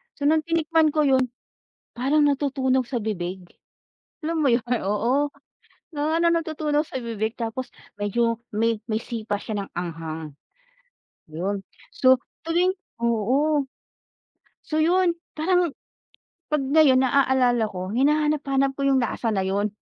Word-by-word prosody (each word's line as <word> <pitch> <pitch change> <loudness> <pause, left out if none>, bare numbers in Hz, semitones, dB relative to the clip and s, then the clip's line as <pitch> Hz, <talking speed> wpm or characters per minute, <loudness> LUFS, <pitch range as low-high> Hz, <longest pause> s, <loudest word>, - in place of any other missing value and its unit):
So, 285 - -7
nang 310 +1 +3
tinikman 325 -2 +2
ko 305 - +4
yun, 260 -1 +3 0.7
parang 280 +5 +2
natutunaw 265 -2 +1
sa 245 0 -3
bibig, 190 -4 -3 0.8
alam 325 0 -1
mo 290 - +3
yun, 235 0 +2
ay 245 - +2
oo, 240 +8 +1 0.7
na 310 +2 0
natutunaw 315 -3 +1
sa 260 - -5
bibig 220 -1 -3
tapos 235 +2 -4 0.3
medyo 230 +3 0 0.2
may 225 0 +1
may 220 -1 0
sipa 225 -3 -3
siya 205 -3 -4
ng - - -20
anghang. 160 -3 -5 1.0
Yun, 190 +5 -3 0.3
so, 260 0 +5 0.3
tuwing 350 +3 +2 0.3
oo. 265 +7 +2 1.0
So, 310 0 0
yun 350 +1 +3 0.2
parang 355 +1 +2 0.8
'pag 300 -1 +1
ngayon 270 -2 +5
naalala 255 -3 +3
ko 185 0 -5
hinahanap-hanap 280 0 +2
ko 280 - -4
yung 270 -1 +3
lasa 235 0 -2
na 190 - +1
yun. 200 +2 0
260 Hz, 130 wpm, -24 LUFS, 220-300 Hz, 1.0 s, so